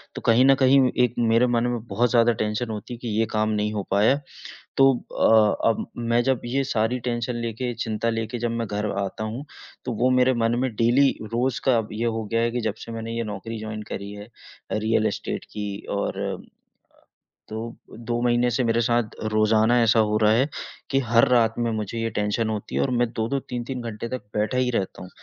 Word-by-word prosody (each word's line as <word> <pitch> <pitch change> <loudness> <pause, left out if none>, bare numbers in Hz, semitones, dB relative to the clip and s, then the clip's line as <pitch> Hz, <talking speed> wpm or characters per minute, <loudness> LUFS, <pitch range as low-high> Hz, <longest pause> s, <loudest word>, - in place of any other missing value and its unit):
तो - - -5
कहीं 115 +3 +4
न 135 0 +6
कहीं 135 +1 +6 0.2
एक 120 - +1
मेरे 115 +1 +4
मन 120 -1 +1
में 120 -1 -1
बहुत 120 +1 +1
ज़्यादा 120 -1 +5
टेंशन 110 +3 -1
होती 110 +2 -6
है - - -6
कि 125 - -6
ये 115 - +3
काम 110 0 +1
नहीं 105 0 0
हो 100 -2 -2
पाया। 105 +7 +4 0.6
तो 135 0 +7 0.3
अ, 110 0 +4
अब 115 - -1
मैं 120 0 +1
जब 130 -1 +1
ये 135 +3 0
सारी 125 -1 0
टेंशन 120 0 -2
लेके, 115 +2 -3
चिंता 115 0 -2
लेके 115 +1 -2
जब 120 0 -1
मैं 115 -1 -2
घर 105 0 -2
आता 100 +2 -4
हूँ, 115 +7 -5 0.4
तो 125 - -2
वो 130 - +4
मेरे 130 0 +4
मन 115 0 +1
में 130 - +1
डेली 120 +5 +4 0.2
रोज़ 125 +1 0
का 130 -3 +4
अब 110 -1 -2
ये 115 +2 -2
हो 115 -1 -1
गया 115 - +2
है 115 0 +1
कि 120 0 -2
जब 110 -2 -2
से 115 - -8
मैंने 115 0 -5
ये 115 - -1
नौकरी 110 +2 -6
जॉइन 110 0 -5
करी 100 +1 -5
है 105 0 -9
अ, 115 - -21 0.4
रियल 110 0 +1
एस्टेट - - -4
की 105 -1 -4 0.3
और - - -2
अ, - - -3 1.1
तो 115 +2 -5 0.2
2 120 +1 -3
महीने 120 0 +3
से 125 +3 +1
मेरे 115 0 +2
साथ 120 -1 0 0.2
रोज़ाना 110 +2 +4
ऐसा 115 0 +4
हो 105 - +2
रहा 105 - +5
है 130 +6 +2 0.4
कि 135 - +3
हर 115 0 +6
रात 115 -2 +4
में 115 -1 0
मुझे 110 +1 -3
ये 115 - 0
टेंशन 105 +2 0
होती 105 -2 -4
है - - +2
और 135 - 0
मैं 120 - +3
2-2 115 +5 -1
3-3 125 +1 -4
घंटे 115 -1 -5
तक 130 -3 -4
बैठा 105 +4 0
ही 125 0 +2
रहता 100 -5 -2
हूँ, 90 - -10
115 Hz, 220 wpm, -24 LUFS, 110-120 Hz, 1.1 s, तो